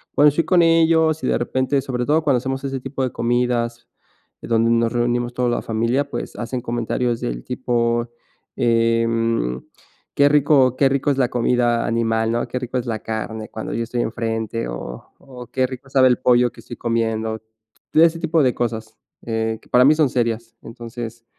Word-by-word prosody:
bueno, 145 +1 +6
estoy 160 +3 0
con 180 -2 +4
ellos 160 -2 +3
y - - 0
de - - +2
repente, 130 +3 0
sobre 125 -2 -3
todo 155 +2 +2
cuando 135 -4 +3
hacemos 135 +2 -3
ese 135 -1 -3
tipo 135 +1 -4
de 130 - -1
comidas, 120 0 -1 0.5
donde 115 0 +1
nos 115 0 +2
reunimos 120 0 0
toda 125 -1 0
la 120 - -1
familia, 115 +6 -1
pues - - -5
hacen 120 +1 -4
comentarios 120 0 -2
del - - -4
tipo: 120 -1 -1 0.5
"Eh, 115 0 +2
mm, 115 - 0 0.6
qué 140 0 +5
rico 145 -3 +4
qué 135 0 +3
rico 140 +1 +1
es 135 - -1
la 125 -2 +2
comida 120 -1 +1
animal, 115 -1 0
¿no? 120 - -1
Qué 125 - -4
rico 125 0 -4
es 120 - -6
la 115 - -1
carne". 110 0 -5
Cuando 110 - -6
yo 115 - -1
estoy 120 +1 -2
enfrente, 115 0 -3
o - - -7 0.2
o: 125 -3 -11
"Qué 130 -1 +1
rico 130 +1 -9
sabe 130 -1 +5
el 125 - +3
pollo 125 -1 +3
que - - -15
estoy 120 - -10
comiendo". 110 -1 -1 0.5
Todo 160 - +5
ese 165 0 +3
tipo 165 -1 +1
de 125 - +2
cosas, 110 -2 -4 0.3
eh, 110 -1 -2
que - - -23
para 125 +1 +5
mí 150 - +7
son 150 -4 +3
serias. 115 -2 -2
Entonces, 115 0 -8
120 Hz, 190 wpm, -21 LUFS, 115-130 Hz, 0.6 s, mí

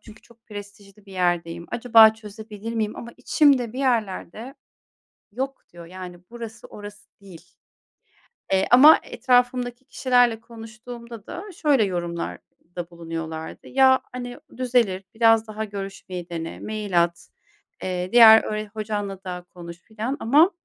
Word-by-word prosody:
çünkü 215 -1 -16
çok 235 -1 -23
prestijli 205 -1 -12
bir 195 - -13
yerdeyim. 170 -2 -1
Acaba 225 -2 +6
çözebilir 215 0 -9
miyim? 215 -2 -2
Ama 235 - -8
içimde 255 -2 +3
bir 255 - -7
yerler 225 -10 -1
de, 245 +5 -9 0.8
"Yok" 265 +4 -5
diyor, 170 -1 -11
yani, 180 0 -9
"Burası, 230 -2 -9
orası 205 0 -12
değil" 190 -4 -13 1.1
Eee, 190 0 +3
ama 280 +6 +9
etrafımdaki 245 0 0
kişilerle 245 -4 +2
konuştuğumda 230 0 -11
da 355 - -7
şöyle 280 -8 +3
yorumlarda 175 -1 -6
bulunuyorlard:; 165 -1 -6
"Ya, 260 0 +4
hani, 245 -1 -7 0.2
düzelir. 235 -7 +1
Biraz 225 0 +4
daha 215 0 -5
görüşmeyi 195 -3 -7
dene. 165 -1 -6
Mail 210 -5 0
at. 170 0 -8 0.5
Eee, 180 0 -3
diğer 225 -2 +9
öğre 215 0 -3
hocanla 205 -3 -4
da 180 -1 -6
konuş" 170 -1 -10
filan 225 +5 -4
ama 295 +10 +5
215 Hz, 130 wpm, -23 LUFS, 185-240 Hz, 1.1 s, ama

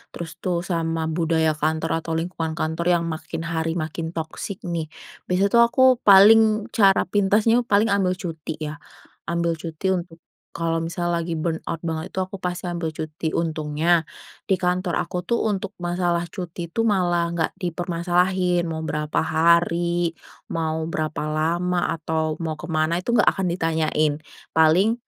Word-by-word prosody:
terus 170 0 -7
tuh 175 -2 -1
sama 165 -2 -1
budaya 160 -1 +1
kantor 160 +1 -1
atau 165 0 -4
lingkungan 165 -1 -3
kantor 165 +1 -2
yang 170 - 0
makin 165 0 -5
hari 165 0 -2
makin 160 0 -4
toksik 165 +4 -5
nih, 170 -3 -3 0.4
biasanya 190 +2 +2
tuh 235 0 +7
aku 260 - +3 0.2
paling 215 +2 +7
cara 195 -3 +4
pintasnya 210 +4 +3
paling 210 +1 +3
ambil 190 -2 +2
cuti 165 -5 -6
ya, 150 -1 -5 0.5
ambil 170 -1 0
cuti 165 +4 -2
untuk 170 -2 -5 0.4
kalau 165 0 -1
misal 170 +1 -2
lagi 170 -1 -1
burnout 160 0 -3
banget 160 +2 -4
itu - - -4
aku 185 +1 -6
pasti 180 -1 -3
ambil 170 -2 -3
cuti. 155 +1 -4
Untungnya 160 +1 +1 0.4
di 195 - +3
kantor 180 -1 0
aku 180 0 -5
tuh 235 - +1
untuk 200 0 -3
masalah 175 -1 -1
cuti 175 -2 -6
tuh 225 +5 0
malah 175 -5 +2
nggak 165 -2 0
dipermasalahin, 175 0 0
mau 160 - -3
berapa 150 0 -2
hari, 170 +1 +2 0.3
mau 160 -1 -2
berapa 155 -1 -3
lama, 170 +3 0
atau 160 0 -2
mau 160 -2 -3
ke 155 - -9
mana 160 +3 +1
itu - - -3
nggak 240 - +3
akan 190 -1 -1
ditanyain. 160 -3 +1 0.4
Paling 165 +8 +4
170 Hz, 155 wpm, -23 LUFS, 160-180 Hz, 0.5 s, tuh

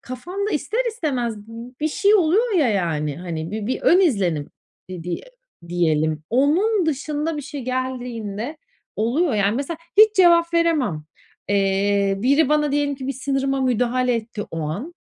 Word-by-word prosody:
kafamda 360 - -5
ister 460 +3 -1
istemez 260 - -2
bi 235 +2 -10
bir 310 - +1
şey 400 +6 +3
oluyor 415 +5 +3
ya, 285 -7 +3
yani, 155 -7 -1
hani, 165 -2 -5
bir 215 0 -4
bir 260 - -2
ön 360 - +5
izlenim 190 - +1 0.4
di 180 -3 -6
diye 175 -1 -4 0.5
diyelim. 155 -3 0
Onun 335 - +2
dışında 300 +2 -2
bir 295 - -4
şey 280 0 -7
geldiğinde 250 -1 -4 0.4
oluyor, 250 +6 +1
yani 205 +2 +1
Mesela 300 +4 -4 0.2
hiç 430 0 +7
cevap 340 -2 +5
veremem. 285 - +1 0.4
Eee, 200 0 +2
biri 275 +6 +3
bana 300 -1 +2
diyelim 285 -1 +1
ki 265 -1 -7
bir 275 - -1
sınırıma 270 +1 -1
müdahale 250 0 +1
etti 225 -2 -4
o 165 - -4
an. 200 - -4
255 Hz, 155 wpm, -22 LUFS, 200-310 Hz, 0.5 s, hiç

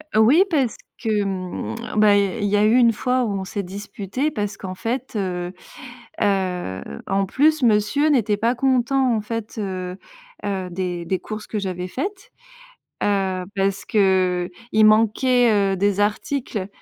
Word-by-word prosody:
Heu, - - +5
oui, 280 - +6
parce 275 - +1 0.3
que, 215 -3 +1
mmh, 185 - -4 0.2
bah 210 -1 +6
il 200 - +4
y - - 0
a - - -6
il 205 - +1
y 205 - +2
a 205 - +3
eu 220 +2 +4
une 235 -2 +5
fois 250 +3 0
où 210 - -2
on - - -4
s'est 200 +1 -4
disputés 205 +8 -4
parce 205 -6 -3
qu'en 185 -1 -6
fait, 240 +6 -3
heu 180 -3 -2 0.7
heu, 180 - -1 0.2
en 195 0 +1
plus, 305 +8 +2
monsieur 235 +6 +3
n'était 230 -8 +2
pas 230 +4 +1
content, 260 0 +2
en - - 0
fait, 220 +1 -5
heu 185 -3 -4 0.5
heu, 190 -2 -2
des 175 -1 -3
des 185 +2 -1
courses 215 +2 -7
que 215 - -3
j'avais 185 -2 -4
faites, 395 - -5 0.7
heu, 190 -2 0
parce 195 0 0
qu'il 185 -4 +2 0.3
manquait, 225 +3 +4 0.2
heu, - - -4
des 200 +1 +1
articles, 210 -1 -1
205 Hz, 170 wpm, -22 LUFS, 190-240 Hz, 0.7 s, oui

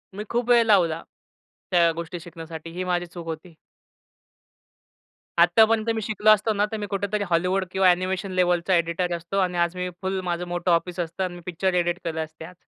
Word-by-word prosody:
मी 210 - -4
खूप 240 +1 -1
वेळ 240 -1 +6
लावला, 170 -7 +3 0.7
त्या 170 -2 +4
गोष्टी 170 +1 -5
शिकण्यासाठी 165 -1 -9
ही 180 +2 -4
माझी 175 -1 -1
चूक 175 -1 -10
होती. 165 +1 -7 1.8
आत्तापर्यंत 220 +6 +4
मी 220 - -2
शिकलो 215 0 +1
असतो 215 +1 +5
ना 205 0 +2
तर 220 - -2
मी 210 - -4
कुठेतरी 200 +1 -1
हॉलीवूड 180 +3 +1
किंवा 190 -1 +4
ॲनिमेशन 185 +2 0
लेवलचा 180 +1 +2
एडिटर 170 +1 0
असतो 170 +4 -5
आणि 180 -2 0
आज 170 +1 +1
मी 180 0 -3
फुल 190 0 -1
माझं 175 +1 -2
मोठं 175 0 -1
ऑफिस 175 +1 0
असतं 170 +2 -2
आणि 180 -1 -3
मी 175 - -10
पिक्चर 180 +1 -1
एडिट 175 0 +1
केलं 160 -2 -2
असते 160 +1 -12
आज. 180 - -12
180 Hz, 190 wpm, -24 LUFS, 170-195 Hz, 1.8 s, वेळ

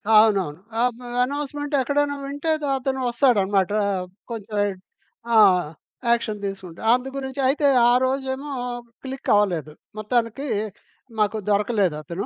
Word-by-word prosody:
అవునవును. 195 -8 +4 0.2
ఆబ్ 245 -1 0 0.2
అనౌన్స్‌మెంట్ 290 +2 -4
ఎక్కడైనా 285 +2 0
వింటే 285 +3 -2
ద - - 0
అతను 265 0 -2
వస్తాడనమాట 205 -7 +2 0.2
ఆహ్, 185 -2 -1 0.3
కొంచెం 215 -2 -4 0.8
ఆ! - - +7 0.7
యాక్షన్ 225 -3 0
తీసుకుంటాటే. 190 -1 -7
అందు 250 +2 0
గురించి 270 0 -5
అయితే 285 +1 +2 0.2
ఆ 240 - +5
రోజేమో 265 +2 -2 0.5
క్లిక్ 265 0 -6
అవ్వలేదు. 175 -7 +1 0.3
మొత్తానికి 230 +5 -1 0.7
మాకు 215 +1 +2
దొరకలేదు 205 -4 +2
అతను. 170 +7 -5
235 Hz, 120 wpm, -23 LUFS, 200-270 Hz, 0.8 s, ఆ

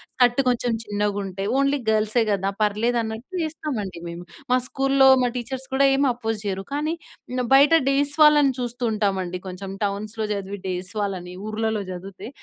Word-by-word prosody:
Skirt 245 0 +3
కొంచెం 245 0 0
చిన్నగా 205 -1 -1
ఉంటే 195 0 -5
ఓన్లీ 275 +1 +2
గర్ల్సే 220 +2 +2
కదా! 195 0 0
పర్లేదు 215 +3 +1
అన్నట్టు 230 +12 -5
యేస్తామండి 255 - -4
మేము. 170 +1 -7 0.3
మా - - +5
స్కూల్లో 270 0 +3 0.2
మా 245 - +2
టీచర్స్ 260 +2 -5
కూడా 275 +1 +5
ఏమి 275 0 +3
అపోజ్ 225 -2 -3
చేయరు. 195 -1 -2
కానీ 300 +3 -1 0.6
బయట 280 +3 +6 0.2
డేస్ 280 +1 +1
వాళ్ళని 295 -3 +6
చూస్తూ 245 0 -4
ఉంటామండి. 190 -4 -1
కొంచెం 190 +1 -6
టౌన్స్‌లో 210 +2 -3
చదివి 200 0 -5
డేస్ 185 +2 -4
వాళ్ళని 185 -3 -4 0.2
ఊర్లలో 220 -1 -1
చదివితే, 185 +4 -8
220 Hz, 155 wpm, -23 LUFS, 195-265 Hz, 0.6 s, బయట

